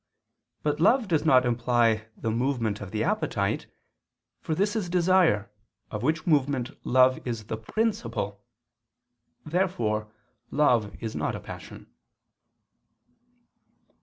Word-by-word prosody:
But 150 0 0
love 225 +7 +4
does 160 -4 +1
not 130 -5 +5
imply 120 -2 +2
the 110 - -2
movement 115 -3 -1
of 100 - -6
the - - -1
appetite; - - -1 0.7
for 160 - -2
this 205 +5 0
is 200 -6 -2
desire, 175 - +3 0.4
of 105 - -4
which 155 +5 0
movement 140 -5 +1
love 130 0 +4
is 115 -3 -4
the 110 +1 -4
principle. 110 - -2 1.0
Therefore 120 - -1 0.4
love 120 -8 +2
is 110 - -4
not - - -1
a - - -5
passion. - - -10
130 Hz, 115 wpm, -27 LUFS, 110-160 Hz, 1.0 s, not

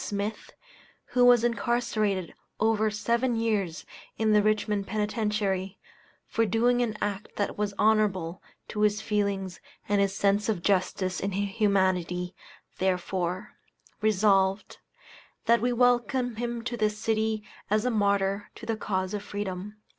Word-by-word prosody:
Smith, 205 +1 -4 0.6
who 250 - +3
was 245 -2 +6
incarcerated 220 -5 0 0.3
over 220 0 +2
seven 235 +4 0
years 210 -7 -1 0.3
in 220 -1 +2
the 210 - +6
Richmond 210 -1 0
Penitentiary, 210 -3 -1 0.5
for 225 - 0
doing 235 +4 +2
an 220 -3 -1
act 205 0 -4
that 205 - -1
was 205 -1 -2
honorable 195 -5 +2 0.3
to 210 - -3
his 210 0 +3
feelings 200 -3 -1 0.3
and 205 0 +2
his 195 0 0
sense 200 +2 +2
of 190 -6 -1
justice 185 -1 +1
and 195 -1 -2
humanity, 190 -3 +1 0.5
therefore, 185 +1 -1 0.5
Resolved, 195 -2 +2 0.7
That 235 -1 +4
we 245 +1 +1
welcome 245 0 +2
him 235 0 -3
to 245 0 -3
this 215 -2 0
city 220 0 0 0.3
as 215 +3 +2
a 250 - +2
martyr 200 -1 +1
to - - -10
the 225 - -1
cause 190 -3 -2
of 205 - -2
Freedom. 205 0 -5
210 Hz, 135 wpm, -27 LUFS, 195-220 Hz, 0.7 s, was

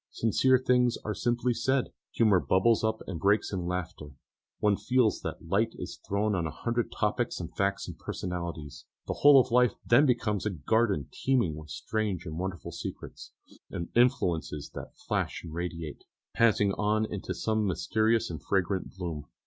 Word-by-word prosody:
Sincere 130 +3 +3
things 125 -1 +2
are 105 - -1
simply 120 +2 0
said, 130 +3 0 0.2
humour 105 -5 +4
bubbles 95 +6 +3
up 110 0 -1
and 90 -4 -5
breaks 100 +4 +2
in 90 -2 -2
laughter; 85 -5 -5 0.4
one 105 -1 +2
feels 125 0 +1
that - - -6
light 110 +6 +1
is - - -6
thrown 105 +2 +1
on 85 -4 0
a - - -3
hundred 115 +8 -2
topics 115 +3 -1
and 85 -1 -7
facts 100 +1 0
and - - -9
personalities. 85 -5 -5 0.2
The - - -2
whole 145 -1 +9
of 130 -1 +1
life 125 0 +4
then 130 +6 +5
becomes 110 -5 0
a - - +2
garden 95 - +1
teeming 120 - +1
with 75 0 -10
strange 100 +1 -2
and 80 -1 -5
wonderful 95 -1 -4
secrets, - - -8 0.4
and 85 - -5
influences 85 - +1
that - - -9
flash - - -1
and 80 -2 -8
radiate, 85 -2 -5 0.3
passing 105 -3 +3
on 105 +2 +1
into 100 -3 -5
some 110 -1 0
mysterious 110 +5 +1
and 80 -4 -6
fragrant 95 +3 -1
gloom. 80 -5 -5
100 Hz, 165 wpm, -29 LUFS, 85-115 Hz, 0.4 s, whole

